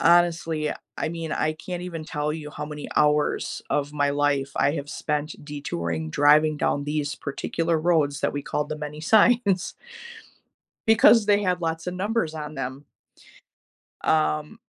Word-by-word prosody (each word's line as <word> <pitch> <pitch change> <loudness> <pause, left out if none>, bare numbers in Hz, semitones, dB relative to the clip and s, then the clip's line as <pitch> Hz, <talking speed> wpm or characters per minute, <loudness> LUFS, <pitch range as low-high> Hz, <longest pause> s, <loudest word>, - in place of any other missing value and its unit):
honestly, 165 -3 +3 0.3
I - - -1
mean, 165 -1 -4
I 155 0 0
can't 175 +2 -6
even 170 -3 -6
tell 150 -2 -2
you 155 -1 -6
how 150 0 -5
many 150 -1 -7
hours 150 0 +1
of 145 0 0
my 145 -1 +2
life 140 -1 +1
I 140 +1 +3
have 145 -1 -5
spent 150 0 -2
detouring, 85 - -4
driving 150 - +4
down 145 0 0
these 145 -1 -2
particular 165 +3 -2
roads 155 -4 +1
that - - 0
we 145 - -3
called 150 +1 -2
The 155 - -2
Many 150 0 -6
Signs 205 0 +3 1.1
because 225 0 +6
they 205 0 +4
had 180 -2 0
lots 165 0 -2
of 180 - -4
numbers 195 -3 -1
on 150 -1 -6
them. 135 +2 -5 1.2
Um, 155 +4 +1
155 Hz, 155 wpm, -25 LUFS, 145-170 Hz, 1.2 s, because